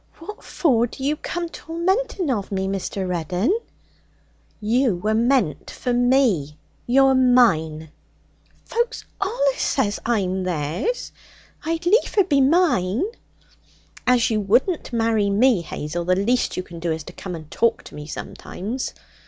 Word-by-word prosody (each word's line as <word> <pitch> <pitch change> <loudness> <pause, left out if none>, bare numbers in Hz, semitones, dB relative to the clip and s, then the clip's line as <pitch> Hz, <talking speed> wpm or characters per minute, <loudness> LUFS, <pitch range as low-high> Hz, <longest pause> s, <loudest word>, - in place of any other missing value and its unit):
'What 395 +6 -10
for 240 -8 +2
do 265 - -9
you 290 +3 +1
come 345 +3 -4
tormenting 360 - -1
of 205 -5 -2
me, 190 -1 -1
Mr. 195 0 -3
Reddin?' 180 - 0 1.0
'You 230 0 +2
were 210 +5 -1
meant 230 - +1
for 250 - -3
me. 240 - +2 0.3
You're 270 +2 +5
mine.' 160 - +3 0.7
'Folk 475 +1 -1 0.3
allus - - 0
says 210 -7 0
I'm 190 -5 0
theirs. 175 - -2 0.5
I'd 330 +1 -2
liefer 405 +1 +3
be 285 -6 +2
mine.' 275 - +2 1.0
'As 245 -2 +4
you 215 -1 +1
wouldn't 250 - +1
marry 225 -3 +1
me, 215 0 +3
Hazel, 170 +1 -4
the 185 +1 +2
least 235 +6 +1
you 185 - -2
can 170 -2 -10
do 170 0 -1
is 160 -1 -3
to 180 - -11
come 180 -1 -6
and 155 -2 -11
talk 230 -1 +1
to - - -13
me 150 0 -8
sometimes.' 215 - -5
230 Hz, 140 wpm, -22 LUFS, 185-280 Hz, 1.0 s, You're